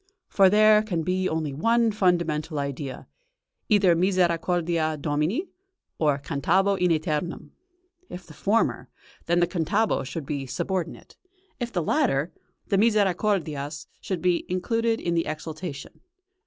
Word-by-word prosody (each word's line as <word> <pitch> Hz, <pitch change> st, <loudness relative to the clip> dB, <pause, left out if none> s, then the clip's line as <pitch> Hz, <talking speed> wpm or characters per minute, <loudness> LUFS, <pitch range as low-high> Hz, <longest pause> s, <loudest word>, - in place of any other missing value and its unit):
For 195 Hz, -2 st, +5 dB
there 215 Hz, +1 st, +6 dB
can 180 Hz, -7 st, -2 dB
be 185 Hz, +2 st, 0 dB
only 155 Hz, -3 st, -2 dB
one 230 Hz, +9 st, +2 dB
fundamental 170 Hz, -6 st, 0 dB
idea 140 Hz, -1 st, -4 dB, 0.6 s
either 200 Hz, -5 st, +4 dB
"Misericordias 170 Hz, -3 st, +1 dB
Domini" 155 Hz, -, -1 dB, 0.5 s
or 150 Hz, -3 st, +2 dB
"cantabo 175 Hz, +8 st, +1 dB
in 180 Hz, -1 st, +1 dB
æternum." 155 Hz, +1 st, -2 dB, 0.6 s
If 180 Hz, 0 st, -8 dB
the 155 Hz, -, -13 dB
former, 210 Hz, +8 st, 0 dB, 0.4 s
then 175 Hz, +1 st, +2 dB
the -, -, +5 dB
"cantabo" 190 Hz, +5 st, 0 dB
should 140 Hz, +3 st, -6 dB
be 140 Hz, -1 st, -4 dB
subordinate; 180 Hz, +6 st, -4 dB, 0.4 s
if 240 Hz, -1 st, -3 dB
the 175 Hz, -6 st, -1 dB
latter, 170 Hz, -, +1 dB, 0.3 s
the 195 Hz, -, +1 dB
"Misercordias" 185 Hz, -9 st, 0 dB, 0.2 s
must 185 Hz, -3 st, -1 dB
be 180 Hz, -1 st, +2 dB
included 225 Hz, +5 st, 0 dB
in 170 Hz, -, -2 dB
the 165 Hz, -1 st, 0 dB
exultation. 155 Hz, 0 st, -6 dB
175 Hz, 130 wpm, -25 LUFS, 155-200 Hz, 0.6 s, there